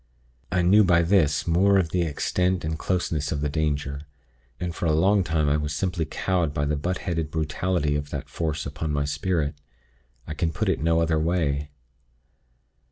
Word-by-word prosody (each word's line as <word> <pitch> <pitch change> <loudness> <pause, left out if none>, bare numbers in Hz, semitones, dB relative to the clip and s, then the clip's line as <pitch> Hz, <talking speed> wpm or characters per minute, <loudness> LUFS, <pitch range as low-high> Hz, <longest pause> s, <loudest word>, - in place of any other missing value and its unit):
I 90 0 +2
knew 100 +5 +6
by 85 -2 +4
this 80 -5 +2
more 95 +4 +4
of 90 -4 +1
the 90 - +1
extent 90 +3 0
and 80 0 -1
closeness 85 -5 -1
of 75 - -2
the 75 - 0
danger; 70 -2 -2 0.6
and 90 -1 -3
for 85 - -2
a 80 - +3
long 95 +5 +3
time 80 -3 0
I 70 +1 +3
was 75 -1 -3
simply 90 0 -1
cowed 85 -2 -1
by 70 - 0
the 75 +1 0
butt 90 +6 -2
headed 80 -4 -1
brutality 80 0 -1
of 75 0 -3
that 75 -3 -5
Force 80 -3 -3
upon 75 +2 -4
my 70 -1 0
spirit. 75 +1 -1 0.7
I 75 - -5
can 80 +1 -1
put 75 - -1
it - - +1
no 85 +1 +2
other 80 -1 +1
way. 75 -4 0
80 Hz, 185 wpm, -25 LUFS, 75-90 Hz, 0.7 s, knew